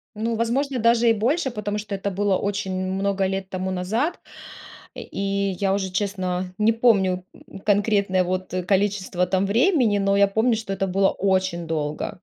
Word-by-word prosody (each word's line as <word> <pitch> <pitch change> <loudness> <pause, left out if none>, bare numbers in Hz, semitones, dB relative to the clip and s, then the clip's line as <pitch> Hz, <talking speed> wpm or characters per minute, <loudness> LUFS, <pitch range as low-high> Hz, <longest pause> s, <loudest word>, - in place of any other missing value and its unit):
Ну, 225 +2 -1
возможно, 255 +4 0
даже 230 +1 +4
и - - +5
больше, 265 +7 0
потому 210 -2 -3
что 205 -1 -6
это 195 +1 -3
было 195 0 +1
очень 200 -1 -2 0.2
много 195 0 0
лет 190 0 -3
тому 185 0 -3
назад. 220 - -1 0.8
Э, - - -6
и 200 0 -2
я 195 -1 +1
уже, 190 -1 -2
честно, 185 -2 -2
не 215 +2 +4
помню, 195 -6 +2
м, - - -13
конкретное 200 -2 +2
вот, 185 +1 -3
э, 185 - -1
количество 190 -1 0
там 190 +1 +1
времени, 235 - +3
но 195 0 +2
я 200 0 +5
помню, 220 +4 +2
что 215 -3 -4
это 195 0 -1
было 195 +1 +2
очень 185 -3 0
долго. 150 -2 -3
200 Hz, 175 wpm, -23 LUFS, 185-215 Hz, 0.8 s, и